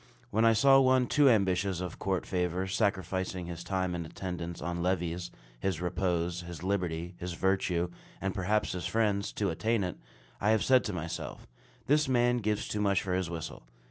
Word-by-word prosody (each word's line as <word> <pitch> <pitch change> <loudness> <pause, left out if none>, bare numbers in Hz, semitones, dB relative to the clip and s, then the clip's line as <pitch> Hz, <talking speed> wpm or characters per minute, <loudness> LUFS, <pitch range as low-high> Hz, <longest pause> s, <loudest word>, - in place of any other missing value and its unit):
When 110 +2 +3
I 115 - +6
saw 135 +4 +6
one 130 -1 +4
too 145 +1 +5
ambitious 95 -4 +2
of 90 -2 -5
court 95 -2 -1
favor, 90 0 -1
sacrificing 95 -2 -1
his 85 0 -6
time 95 -2 -1
in 85 -1 -3
attendance 85 0 -5
on 85 +2 -3
levees, 90 -1 -1 0.3
his 90 +3 -1
repose, 90 -1 -1
his 85 0 -8
liberty, 90 -3 -1
his 90 0 -4
virtue, 90 -1 +1 0.3
and 95 -1 -2
perhaps 105 +2 0
his 90 -3 -3
friends, 105 -3 +1
to 100 -4 0
attain 110 +5 0
it, 90 -2 -4 0.4
I 105 - +2
have 110 -1 +3
said 130 -1 +5
to 105 - -1
myself 85 -1 -5 0.4
"This 150 0 +3
man 120 -1 +3
gives 105 -2 -1
too 105 - -2
much 100 -2 +2
for 95 - -2
his 90 -2 0
whistle." 80 -8 -6
95 Hz, 180 wpm, -30 LUFS, 90-105 Hz, 0.4 s, I